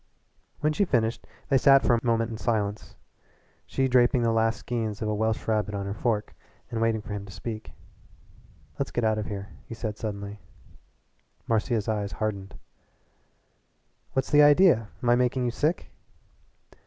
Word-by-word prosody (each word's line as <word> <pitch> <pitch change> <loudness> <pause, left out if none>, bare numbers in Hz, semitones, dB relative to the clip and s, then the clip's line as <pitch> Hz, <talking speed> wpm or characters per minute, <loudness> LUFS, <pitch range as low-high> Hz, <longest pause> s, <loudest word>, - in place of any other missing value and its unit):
When 150 +1 +2
she 175 - +2
finished 115 - 0 0.2
they 135 -3 +4
sat 135 +1 +6
for 120 - +4
a 115 - +1
moment 115 -1 +1
in 110 - -5
silence 105 -3 -2 0.7
she 135 0 0
draping 125 -1 +3
the 115 - +2
last 115 0 +2
skeins 110 -4 -3
of 110 - -2
a 105 - 0
Welsh 110 +1 -1
rabbit 105 -2 0
on 100 -1 -3
her 100 - -3
fork 110 -1 -1 0.4
and 115 - -2
waiting 115 -1 +1
for 105 - -6
him 100 -1 -4
to - - -10
speak. 110 +2 -7 1.1
"Let's - - -1
get 120 - -2
out 110 -1 +2
of 105 - -4
here," 100 -1 -6 0.2
he 115 - -7
said 110 -2 -5
suddenly. 100 -1 -5 1.1
Marcia's 110 -1 0
eyes 105 -2 -2
hardened. 100 -3 -4 1.6
"What's 135 0 -1
the 150 - +7
idea? 145 - +5
Am 120 - +2
I - - +6
making 125 +1 +1
you 120 - 0
sick?" 150 +8 -1
115 Hz, 165 wpm, -26 LUFS, 105-125 Hz, 1.6 s, the